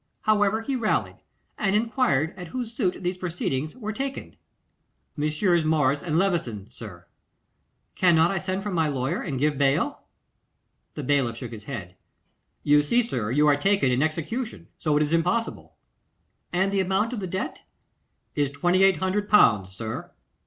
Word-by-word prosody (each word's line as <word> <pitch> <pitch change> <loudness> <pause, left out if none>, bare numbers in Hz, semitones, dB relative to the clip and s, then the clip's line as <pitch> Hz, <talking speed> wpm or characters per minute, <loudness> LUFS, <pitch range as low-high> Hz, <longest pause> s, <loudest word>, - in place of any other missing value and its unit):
However, 215 0 +2
he 270 +4 -2
rallied, 225 -4 0 0.4
and 200 -1 +1
enquired 215 - +1
at 180 -2 -8
whose 240 +4 -5
suit 190 -8 -1
these 180 +1 -1
proceedings 155 -5 -3
were 215 -4 -5
taken. 270 +3 -5 0.8
'Messrs. 155 +3 +1
Morris 150 -3 +2
and 160 -3 -1
Levison, 165 - 0
sir.' 90 -7 -11 0.9
'Cannot 170 -2 +4
I 195 - -1
send 190 +1 -3
for 205 - -3
my 165 -3 +1
lawyer 140 +4 -1
and 140 -7 -3
give 145 +1 0
bail?' 135 -1 +1 0.9
The 150 - -5
bailiff 125 -4 +1
shook 120 -1 -7
his 110 -3 -9
head. 95 -9 -7 0.7
'You 145 0 +5
see, 235 +12 +2
sir, 120 - -3
you 150 +5 +3
are 145 - +5
taken 195 -3 +2
in 125 +2 +1
execution, 170 - -3
so 150 -2 +1
it 150 - +3
is 150 +2 -2
impossible.' 180 +8 -1 0.8
'And 190 +2 +1
the 200 - +1
amount 195 +5 +1
of 235 - -3
the 190 - -4
debt?' 190 +2 -4 0.7
'Is 145 -2 +1
2,800L., 185 - +3
sir. 110 +4 -6
170 Hz, 150 wpm, -25 LUFS, 140-195 Hz, 0.9 s, You